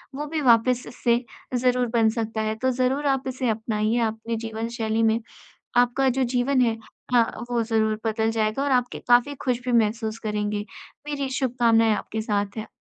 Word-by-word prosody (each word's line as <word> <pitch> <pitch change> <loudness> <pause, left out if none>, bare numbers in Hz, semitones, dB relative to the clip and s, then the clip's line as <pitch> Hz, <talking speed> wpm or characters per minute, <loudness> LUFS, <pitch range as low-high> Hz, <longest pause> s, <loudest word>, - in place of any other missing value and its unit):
वो 295 +2 -3
भी 315 0 -2
वापस 245 -1 +4
इससे 235 -1 +1 0.4
ज़रूर 250 0 +2
बन 225 -2 +4
सकता 220 -1 -2
है, 215 0 -1
तो 260 +4 0
ज़रूर 260 +3 0
आप 270 -1 0
इसे 255 -2 -2
अपनाइए 220 0 0
आपने 225 +1 -5
जीवन 225 +1 -4
शैली 220 -1 0
में 225 0 +3 0.6
आपका 245 +2 +3
जो 260 +1 +1
जीवन 250 +2 +1
है 230 -2 +1 0.4
अ, 240 - +7 0.3
वो 235 -1 +1
ज़रूर 220 -1 0
बदल 220 0 +1
जाएगा 220 +4 0
और 285 - 0
आपके 250 -1 +1
काफ़ी 245 +4 +4
ख़ुश 250 -2 0
भी 250 - 0
महसूस 220 0 -1
करेंगे। 210 -1 -2 0.4
मेरी 280 -2 -2
शुभकामनाएँ 235 -4 +2
आपके 220 +1 -4
साथ 205 -1 -2
हैं। 220 - -4
230 Hz, 180 wpm, -24 LUFS, 220-255 Hz, 0.6 s, अ